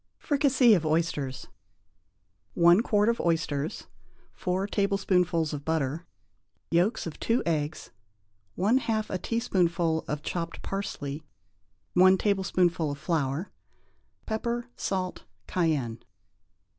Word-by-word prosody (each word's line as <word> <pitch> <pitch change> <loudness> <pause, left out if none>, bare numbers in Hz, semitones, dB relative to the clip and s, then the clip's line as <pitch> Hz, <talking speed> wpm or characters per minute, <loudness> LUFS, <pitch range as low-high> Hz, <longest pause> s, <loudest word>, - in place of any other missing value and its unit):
=Fricassee 275 -5 +4
of 175 -6 +2
Oysters.= 155 -5 -1
INGREDIENTS. 90 -1 -38
1 175 +4 +6
quart 210 -2 +2
of 235 0 +1
oysters. 160 -3 -1 0.5
4 185 +1 -1
tablespoonfuls 185 -5 +1
of 145 -1 -5
butter. 160 +1 -1 0.6
Yolks 180 +7 +2
of 165 - -7
2 230 +2 +1
eggs. 155 -1 -2 0.7
1/2 220 +2 +1
a 185 - -1
teaspoonful 175 -8 0
of 150 +1 -3
chopped 170 -1 -4
parsley. 155 -7 -4 0.7
1 185 +1 +6
tablespoonful 185 -5 +1
of 145 - -4
flour. 155 +2 -1 0.7
Pepper, 235 +2 -2
salt, 185 -2 -3 0.2
cayenne. 145 -10 -1
175 Hz, 105 wpm, -28 LUFS, 155-200 Hz, 0.7 s, 1